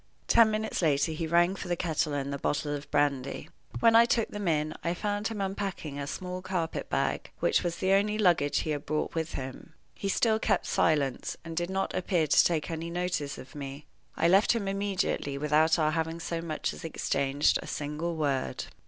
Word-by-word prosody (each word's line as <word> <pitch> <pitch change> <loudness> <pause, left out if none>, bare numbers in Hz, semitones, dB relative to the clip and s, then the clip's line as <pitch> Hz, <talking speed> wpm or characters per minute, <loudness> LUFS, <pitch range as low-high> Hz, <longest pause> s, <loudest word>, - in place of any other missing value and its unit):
Ten 230 -1 +6
minutes 215 -1 -2
later 155 -1 +2
he 160 +1 -3
rang 175 +3 +3
for 195 - -7
the 175 - 0
kettle 160 -2 -1
and 140 0 -2
the 140 - -4
bottle 145 +1 -1
of 145 0 -6
brandy. 140 -2 0 0.3
When 230 -1 +6
I 230 +1 +8
took 235 -1 +1
them 205 -2 -4
in 155 -1 +1
I 170 +1 0
found 205 +2 -1
him 220 -3 -4
unpacking 195 -7 -3
a 140 - -4
small 180 +3 -5
carpet 180 -3 -3
bag, - - -1
which - - +2
was 170 -1 -2
the 190 +1 +1
only 210 +2 +2
luggage 175 -8 +3
he 155 - -2
had 145 -1 -2
brought 155 0 -1
with 165 -1 -2
him. 130 -1 -7 0.2
He 195 - -4
still 220 +2 +2
kept - - +1
silence, 145 -5 +1
and 165 0 -6
did 175 +1 -1
not 190 0 -1
appear 175 -3 +1
to 150 - +5
take 165 -1 0
any 165 +1 -4
notice 175 -5 -2
of 130 +1 -11
me. 140 0 -7 0.3
I 165 - +3
left 195 +6 +5
him 220 -4 -2
immediately 195 -7 -1
without 155 +3 +3
our 155 -1 +2
having 165 +1 -2
so 170 0 -3
much 160 -2 -3
as - - -10
exchanged 140 -3 +1
a - - -9
single 155 +3 -3
word. 140 -4 -1
165 Hz, 205 wpm, -29 LUFS, 150-190 Hz, 0.3 s, I